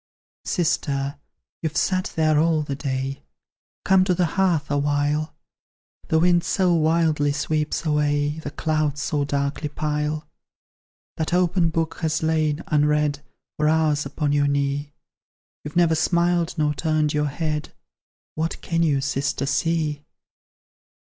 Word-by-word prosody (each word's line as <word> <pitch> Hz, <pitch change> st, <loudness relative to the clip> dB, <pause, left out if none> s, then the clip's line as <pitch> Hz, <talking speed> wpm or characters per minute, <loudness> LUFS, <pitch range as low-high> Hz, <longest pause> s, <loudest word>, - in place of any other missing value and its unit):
"Sister, 145 Hz, -5 st, -1 dB, 0.4 s
you've 155 Hz, -1 st, -2 dB
sat 185 Hz, +2 st, 0 dB
there 155 Hz, -2 st, +3 dB
all 160 Hz, -1 st, +2 dB
the 140 Hz, -, -4 dB
day, 135 Hz, -1 st, -3 dB, 0.6 s
Come 190 Hz, -1 st, +5 dB
to 185 Hz, -2 st, +2 dB
the 180 Hz, -, +2 dB
hearth 180 Hz, -7 st, +1 dB
awhile; 145 Hz, +2 st, 0 dB, 0.7 s
The 160 Hz, -, +2 dB
wind 175 Hz, +1 st, +4 dB
so 180 Hz, +1 st, +2 dB
wildly 160 Hz, -2 st, +2 dB
sweeps 150 Hz, +3 st, -1 dB
away, 150 Hz, 0 st, +1 dB
The 150 Hz, -, -5 dB
clouds 155 Hz, -1 st, -1 dB
so 145 Hz, -2 st, 0 dB
darkly 140 Hz, +1 st, -2 dB
pile. 150 Hz, 0 st, -2 dB, 0.9 s
That 160 Hz, +2 st, -1 dB
open 180 Hz, -1 st, +2 dB
book 165 Hz, 0 st, -2 dB
has 160 Hz, -1 st, -1 dB
lain, 155 Hz, -1 st, +1 dB
unread, 150 Hz, -1 st, +1 dB, 0.4 s
For 150 Hz, 0 st, +2 dB
hours 155 Hz, -2 st, +2 dB
upon 145 Hz, +1 st, -2 dB
your 145 Hz, 0 st, +2 dB
knee; 140 Hz, +1 st, -1 dB, 0.7 s
You've 150 Hz, +2 st, -8 dB
never 170 Hz, -2 st, +4 dB
smiled 170 Hz, +1 st, +1 dB
nor 150 Hz, -1 st, +1 dB
turned 155 Hz, -1 st, 0 dB
your 150 Hz, 0 st, +1 dB
head; 150 Hz, +1 st, -3 dB, 0.6 s
What 160 Hz, +1 st, -3 dB
can 165 Hz, -1 st, -1 dB
you, 145 Hz, -4 st, +2 dB
sister, 140 Hz, 0 st, -1 dB
see?" 150 Hz, 0 st, 0 dB
155 Hz, 130 wpm, -23 LUFS, 145-165 Hz, 0.9 s, Come